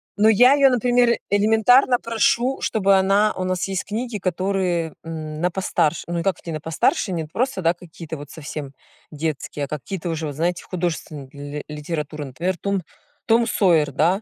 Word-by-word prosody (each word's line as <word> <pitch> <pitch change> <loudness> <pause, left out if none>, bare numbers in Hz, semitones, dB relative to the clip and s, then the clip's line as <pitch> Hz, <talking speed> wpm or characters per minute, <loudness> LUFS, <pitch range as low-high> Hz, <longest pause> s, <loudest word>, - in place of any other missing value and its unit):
Ну, 215 +1 +4
я 245 +5 +6
её, 280 -1 +5
например, 245 -1 +3
элементарно 225 +5 +4
прошу, 245 +3 +1
чтобы 200 -2 +3
она 200 +3 +3
у 185 - -2
нас 185 0 -1
есть 190 -2 -3
книги, 230 +1 -3
которые, 185 -3 -1
м, 155 -1 -6
на 180 +1 +1
постарше, 170 -3 0
ну 170 0 -2
и - - -2
как 195 0 0
вот - - -21
не 165 - -3
на 155 - -3
постарше, 160 +5 0
нет, 160 -3 -4
просто, 255 -3 -1
да, 165 -1 +3
какие-то 165 -2 -9
вот 145 0 -10
совсем 150 -3 -7 0.4
детские, 150 -1 -3
а - - -11
какие-то 160 +5 -5
уже, 160 -1 -3
вот 145 - -6
знаете, 170 +3 -1
художественная 160 -6 -4
ли 145 0 -7
литература, 150 0 -5
например, 170 +8 -3
Том 200 +1 -1 0.5
Том 230 +1 +4
Сойер, 170 -10 +3
да. 180 +8 +2
180 Hz, 180 wpm, -22 LUFS, 155-210 Hz, 0.5 s, я